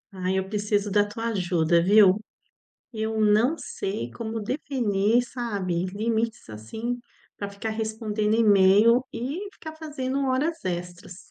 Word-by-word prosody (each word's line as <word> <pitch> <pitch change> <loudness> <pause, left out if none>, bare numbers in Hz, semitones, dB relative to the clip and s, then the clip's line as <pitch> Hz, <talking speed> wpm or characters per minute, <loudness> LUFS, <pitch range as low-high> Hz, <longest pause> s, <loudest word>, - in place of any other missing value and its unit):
Ai, 185 +1 -1
eu 190 0 -1
preciso 205 0 -1
da 205 +1 +4
tua 225 +2 -4
ajuda, 175 -5 +2
viu? 200 +2 +5 0.7
Eu 220 0 -2
não 215 +8 +3
sei 190 - -4
como 225 - -5
definir, 230 -2 +1
sabe, 200 -8 -2
limites, 220 +3 -2
assim, 220 - -5 0.4
pra 200 - -5
ficar 200 +2 -5
respondendo 220 -1 -1
e-mail 215 +2 +5
e 280 - -4
ficar 315 -4 -10
fazendo 280 -4 -3
horas 300 +6 0
extras. 180 0 -5
215 Hz, 125 wpm, -25 LUFS, 195-235 Hz, 0.7 s, viu